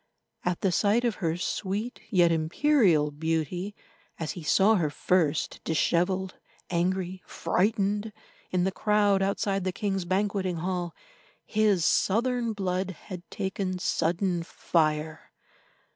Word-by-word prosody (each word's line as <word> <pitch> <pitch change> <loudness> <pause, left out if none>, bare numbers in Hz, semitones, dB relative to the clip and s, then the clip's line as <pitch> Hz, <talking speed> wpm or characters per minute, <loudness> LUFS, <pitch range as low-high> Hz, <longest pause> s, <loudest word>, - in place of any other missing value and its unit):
At 180 -1 -1
the 190 - +2
sight 210 +7 +2
of 235 - 0
her 165 -1 0
sweet 205 +5 -3
yet 175 -5 +4
imperial 165 - +3
beauty, 165 +6 -2 0.4
as 160 -2 -3
he 175 - -7
saw 195 +7 +4
her 170 -8 +2
first, 155 0 0
dishevelled, 180 +3 +1 0.4
angry, 185 +1 -1
frightened, 205 +2 0 0.4
in 180 -1 +1
the 190 - +1
crowd 205 -1 +2
outside 195 0 0
the 185 - 0
king's 195 -2 -2
banqueting 190 -1 0
hall, 175 0 -3 0.5
his 210 -6 +2
southern 235 +2 +2
blood 190 -2 -1
had 185 0 -8
taken 190 -1 -3
sudden 175 +1 0
fire. 155 -2 -1
185 Hz, 120 wpm, -27 LUFS, 170-205 Hz, 0.5 s, yet